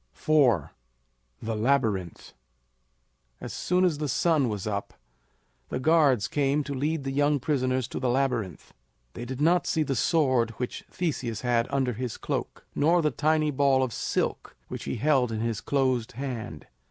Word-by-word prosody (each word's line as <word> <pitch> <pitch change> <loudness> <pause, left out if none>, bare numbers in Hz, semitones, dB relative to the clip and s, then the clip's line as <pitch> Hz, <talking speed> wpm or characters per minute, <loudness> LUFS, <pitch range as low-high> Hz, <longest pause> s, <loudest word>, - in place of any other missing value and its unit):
IV. 130 - +3 0.7
THE 110 0 -2
LABYRINTH. 110 -7 0 1.1
As - - -7
soon 180 +1 +1
as 160 -5 0
the 150 - -1
sun 150 -2 +2
was 105 -3 -4
up 100 -2 -4 0.7
the - - -2
guards 140 -7 +3
came 145 +1 +1
to 140 - -5
lead 145 +3 -1
the 135 - -3
young 145 +1 +2
prisoners 130 -3 0
to - - -4
the 130 - 0
Labyrinth. 125 -7 -1 0.4
They 120 - -6
did 130 +1 -6
not 170 +4 +3
see 160 - +1
the 135 -2 -2
sword 130 -4 +2
which 125 - -4
Theseus 125 - -3
had 120 -1 +1
under 135 -3 0
his 120 0 -4
cloak, - - -4
nor 165 +3 +3
the 150 - +2
tiny 155 +2 +1
ball 135 -1 +3
of 125 -3 -3
silk - - -2
which - - -6
he - - -3
held 125 -1 +2
in 110 -1 -3
his 115 -3 -2
closed 130 -5 0
hand. 115 - -6
130 Hz, 165 wpm, -27 LUFS, 115-150 Hz, 1.1 s, IV